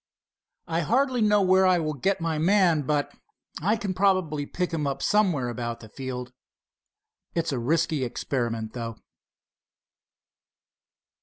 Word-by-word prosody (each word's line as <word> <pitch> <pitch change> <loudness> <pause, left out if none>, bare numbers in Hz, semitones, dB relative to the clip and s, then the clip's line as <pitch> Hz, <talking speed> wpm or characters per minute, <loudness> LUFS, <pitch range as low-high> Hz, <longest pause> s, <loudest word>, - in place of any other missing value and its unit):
I 165 0 -1
hardly 250 - +1
know 210 -1 +4
where 190 0 +5
I 185 -1 +4
will 155 -2 -1
get 190 +8 0
my 165 -2 -1
man, 175 -2 +4
but 145 -1 0 0.5
I 205 +7 +2
can 200 -3 -3
probably 185 -7 +1
pick 180 -1 -3
him 150 -3 -1
up 135 - -3
somewhere 180 -12 +2
about 120 0 -4
the 110 - -12
field. 125 0 -6 1.0
It's 165 -1 0
a 130 - -1
risky 150 +2 +1
experiment, 115 -3 -3
though." 115 -2 -5
160 Hz, 135 wpm, -26 LUFS, 130-190 Hz, 1.0 s, where